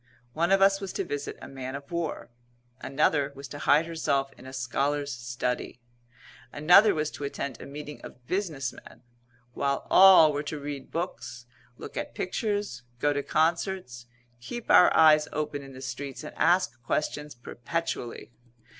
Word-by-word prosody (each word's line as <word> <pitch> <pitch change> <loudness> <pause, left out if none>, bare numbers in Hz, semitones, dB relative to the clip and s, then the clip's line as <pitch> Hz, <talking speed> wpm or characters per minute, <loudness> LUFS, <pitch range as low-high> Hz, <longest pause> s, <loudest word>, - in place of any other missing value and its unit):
One 170 +5 +1
of 195 0 +5
us 195 0 +4
was 195 -2 -4
to - - -2
visit 145 0 -5
a - - -7
man 130 0 -6
of 140 +4 -9
war; 170 -7 -4 0.5
another 140 +1 +1
was 140 +1 -8
to 145 - -8
hide 150 +4 +4
herself 140 -5 -1
in 130 - -14
a - - -8
scholar's 140 +3 -1
study; 120 0 -4 0.7
another 180 +8 +6
was 155 0 -1
to - - -8
attend 140 -3 -4
a - - -9
meeting 150 +1 -8
of 125 - -12
business 155 -8 -2
men; 120 - -15 0.5
while 140 +1 -1
all 185 -5 +8
were 145 - -1
to 150 0 -5
read 140 -1 -6
books, 120 -8 -5 0.3
look - - -9
at - - -5
pictures, 205 - -2 0.2
go 145 +2 +2
to 145 - -1
concerts, 160 -6 -1 0.3
keep 230 - -5
our 180 - +7
eyes 155 -1 +6
open 150 -1 -3
in 135 -1 -11
the 130 - -10
streets, 135 +2 -6
and 150 - -8
ask 120 -10 +2
questions 150 +2 -2
perpetually. 120 0 -5
145 Hz, 165 wpm, -27 LUFS, 130-165 Hz, 0.7 s, all